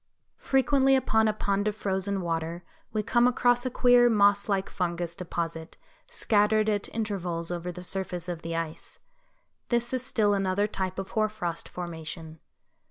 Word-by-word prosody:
Frequently 270 0 +3
upon 220 -4 +2
a - - +3
pond 205 -1 -1
of 210 - -1
frozen 195 -1 -1
water 165 0 -3 0.3
we 215 -1 -1
come 240 +3 +3
across 245 0 +2
a - - 0
queer 245 -1 +5
moss 205 -2 +3
like 195 -1 +1
fungus 175 -1 -3
deposit 165 -3 -5 0.3
scattered 215 0 +2
at 205 -1 -1
intervals 180 -6 -2
over 175 0 -3
the 180 +1 -9
surface 180 -2 -2
of 175 -2 -4
the 165 0 -4
ice. 165 -1 -5 0.7
This 240 0 0
is 255 -1 0
still 220 -6 +2
another 195 0 +1
type 190 -3 -3
of 195 0 -4
hoar 215 -1 +1
frost 175 -6 -5
formation. 160 -2 -7
195 Hz, 160 wpm, -27 LUFS, 175-220 Hz, 0.7 s, queer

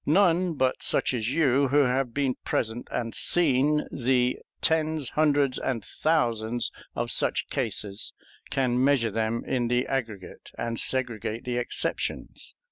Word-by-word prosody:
None 175 +1 +3
but 130 -2 0
such - - +2
as 115 -1 -1
you, 140 -3 +3
who 145 +3 +3
have 130 -1 0
been 135 0 0
present 115 +1 -2
and 115 -2 -3
seen 150 -2 +2
the 125 -1 +1 0.2
tens, 155 -3 +1
hundreds, 145 -3 +2
and 115 -6 -3
thousands 120 -7 0 0.2
of - - 0
such - - +2
cases, 105 -4 -4 0.4
can 125 -2 +1
measure 135 -5 +2
them 110 +2 -1
in 120 -2 -1
the 125 +2 +1
aggregate 110 -8 -5
and 115 -1 -3
segregate 120 -2 0
the 125 -1 -2
exceptions. 120 - -3
125 Hz, 135 wpm, -26 LUFS, 115-145 Hz, 0.4 s, None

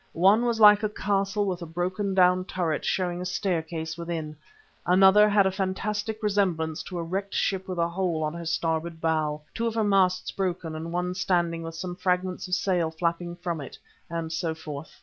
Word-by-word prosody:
One 200 +7 +5
was 235 -2 0
like 210 -1 +8
a 215 - 0
castle 200 0 0
with 185 -2 -2
a 170 - -6
broken 185 +4 -2
down 180 0 +4
turret 170 -5 -2
showing 180 -1 -1
a - - -3
staircase 165 -3 -2
within; 165 -3 -4 0.5
another 190 +3 +6
had 205 -1 +4
a 190 - +2
fantastic 210 +3 -3
resemblance 180 -7 0
to 180 - -6
a 170 - -2
wrecked 195 +4 -3
ship 190 0 0
with 185 -1 -4
a 170 0 +2
hole 170 -3 -1
in 150 - -5
her 170 -1 -6
starboard 160 0 -1
bow, 155 -2 0
two 230 - -1
of 230 - -3
her 225 - +2
masts 190 -3 +2
broken 180 -4 -3
and 165 +1 -5
one 180 +1 -1
standing 175 -3 0
with 165 0 -7
some 180 +1 -5
fragments 185 0 -1
of 180 - +1
sails 175 -5 0
flapping 170 +1 -1
from 175 -3 -4
it, 135 - -9 0.3
and 165 -1 -4
so 160 0 -2
forth. 155 -2 -9
180 Hz, 195 wpm, -26 LUFS, 165-195 Hz, 0.5 s, like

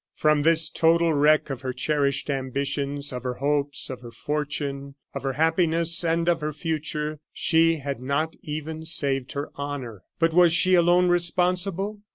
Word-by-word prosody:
From 155 -1 +2
this 160 +1 +3
total 165 0 +3
wreck 150 0 +3
of 130 -2 -5
her 130 -2 -4
cherished 140 +1 -1
ambitions, 140 +1 -3
of 125 - -5
her 125 0 -4
hopes, 145 +1 0
of 130 -2 -7
her 120 - -10
fortune, 140 0 -4 0.2
of - - -5
her 135 -1 -2
happiness, 165 +2 +2
and 165 0 0
of 170 -2 +2
her 150 0 -3
future, 150 -1 -3
she 165 0 +3
had 140 -3 -5
not 140 +5 -1
even 155 +1 -6
saved 140 -5 0
her 140 +1 -5
honor. 140 -8 -6 0.2
But 165 -1 +1
was 175 -1 +5
she 175 +2 +3
alone 175 +1 +4
responsible? 180 +3 0
150 Hz, 165 wpm, -24 LUFS, 140-165 Hz, 0.2 s, was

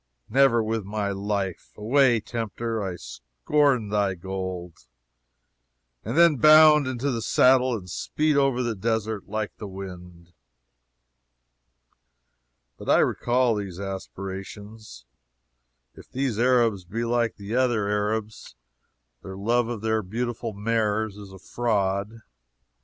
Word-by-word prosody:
Never 125 -2 +4
with 110 0 -2
my 100 0 -3
life! 100 -2 -3
Away, 120 +2 +3
tempter, 115 0 -4
I 95 -3 -3
scorn 100 - -1
thy 100 -2 0
gold!" 90 -5 -6 1.2
and 115 +7 -4
then 170 -4 +6
bound 155 +1 +7
into 130 +2 -2
the 115 -2 -2
saddle 130 +1 +3
and 90 -3 -11
speed 150 - -1
over 135 -3 +2
the 120 -1 -1
desert 110 0 -2
like 110 0 -4
the 105 - -7
wind! 90 -3 -10 2.5
But - - -7
I - - +6
recall 120 -2 +1
those 95 -3 -6
aspirations. 95 - -8 0.9
If - - -15
these 130 -4 -2
Arabs 120 -6 +2
be 110 +7 -4
like 120 -1 0
the 100 +1 -7
other 120 -5 +1
Arabs, 105 - -3 0.7
their 95 0 -9
love 115 +4 +1
for 120 -1 -4
their 110 +1 0
beautiful 115 +3 -4
mares 110 0 -1
is 100 -2 -11
a 95 - -11
fraud. 105 0 -2
110 Hz, 120 wpm, -25 LUFS, 100-120 Hz, 2.5 s, bound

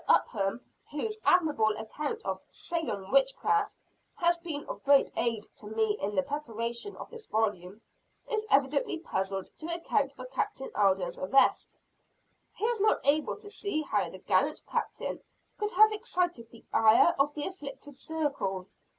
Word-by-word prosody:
Upham, 200 +2 +2 0.2
whose 430 +9 -3
admirable 290 -12 +3
account 300 - -4
of - - -2
"Salem 310 - -4
Witchcraft" 275 +11 +2 0.3
has 345 0 +3
been 320 -4 -5
of - - -7
great 280 0 +5
aid 225 -3 -1
to 210 - -9
me 220 -1 +1
in 205 +1 -2
the 280 - +3
preparation 235 - -3
of - - -9
this 460 -2 -8
volume, 205 -2 -1 0.5
is 435 -2 0
evidently 275 +3 +2
puzzled 195 - -3
to 315 - -6
account 335 -5 0
for 255 -2 -9
Captain 265 +1 -3
Alden's 190 -3 +2
arrest. 235 +9 +3 0.8
He 430 - -2
is 465 -3 +1
not 430 - +4
able 295 +2 +2
to 410 - -10
see 400 -8 -1
how - - 0
the - - -9
gallant - - +1
Captain - - -3 0.4
could 420 0 -1
have 430 +3 +7
excited 360 - -2
the 230 - -16
ire 225 +10 +6
of 290 +1 +2
the 295 - -1
"afflicted 290 -6 -8
circle." 275 -12 -2
280 Hz, 150 wpm, -30 LUFS, 220-345 Hz, 0.8 s, have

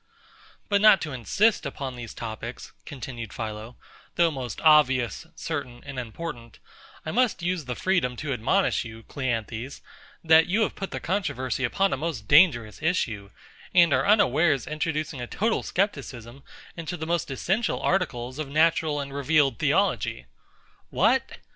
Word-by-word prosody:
But 200 -1 +2
not 215 -2 +7
to 155 - -4
insist 205 - +2
upon 135 -3 -5
these 120 -2 -8
topics, 115 +1 -7 0.2
continued 125 -5 -7
PHILO, 110 +1 -6 0.4
though 170 -1 +3
most 130 -6 -5
obvious, 150 -2 +4
certain, 135 -7 -5
and 135 -2 -6
important; 120 -1 -7 0.5
I 155 - -3
must 240 -5 +1
use 175 -3 -1
the 125 -1 -4
freedom 175 -9 0
to 140 +2 -3
admonish 130 - +1
you, 115 -1 -10
CLEANTHES, 120 0 -4 0.4
that 160 0 +6
you 210 +5 +2
have - - -1
put 195 - -5
the - - -5
controversy 135 -9 -2
upon 195 +10 +1
a - - -1
most 140 -8 -4
dangerous 140 - +4
issue, 115 - -1 0.5
and 170 -4 +6
are 130 +2 +2
unawares 155 - +3
introducing 155 -3 -3
a 120 - -5
total 220 - 0
scepticism 135 - -3 0.3
into 170 +1 -5
the 160 - -5
most 170 -1 -1
essential 190 - -1
articles 130 -7 -1
of 150 -3 -4
natural 155 0 +2
and 140 -1 -5
revealed 140 -3 +2
theology. 60 - +1 0.6
What! - - +2
140 Hz, 150 wpm, -26 LUFS, 120-170 Hz, 0.6 s, not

